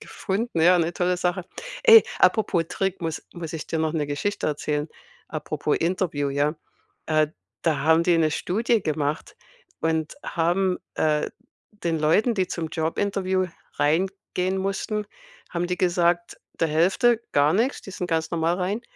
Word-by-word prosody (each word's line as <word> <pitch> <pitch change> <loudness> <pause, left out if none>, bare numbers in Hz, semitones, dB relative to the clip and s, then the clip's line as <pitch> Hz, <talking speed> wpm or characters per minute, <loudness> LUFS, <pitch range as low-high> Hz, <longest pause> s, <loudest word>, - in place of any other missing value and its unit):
gefunden, 200 -2 -3
ja, 175 +2 +6
'ne 170 +1 +1
tolle 180 +1 0
Sache. 180 0 -1 0.4
Ey, 455 -1 +9
apropos 190 -6 +3
Trick, 195 -1 -2
muss 165 -2 -3
muss 170 -3 -6
ich 160 -2 -5
dir 160 - -2
noch 160 0 0
'ne 150 -3 -1
Geschichte 145 +8 -2
erzählen. 150 0 -1 0.4
Apropos - - -2
Interview, 165 -5 0
ja? 145 +2 +1 0.5
Äh, 155 -1 +2 0.3
da 155 -4 +1
haben 160 +3 +4
die 175 -1 +4
'ne 155 -1 +3
Studie 220 +7 0
gemacht 155 - -2 0.4
und 160 -1 -1
haben 180 +3 +1 0.2
äh, 150 -1 +1 0.4
den 170 -6 -2
Leuten, 205 +10 +3
die 190 -2 +1
zum 165 -2 -3
Jobinterview 185 +3 0 0.3
reingehen 185 +4 0
mussten, 205 +2 -2 0.4
haben 175 0 -1
die 180 0 -2
gesagt 175 -1 +1 0.2
der 165 - +3
Hälfte 195 +9 +3
gar 145 +1 +4
nix, 235 +9 +1
die 195 - -9
sind 180 - -4
ganz 160 -1 0
normal 165 0 +1
rein. 195 +4 -1
175 Hz, 150 wpm, -24 LUFS, 160-190 Hz, 0.5 s, Ey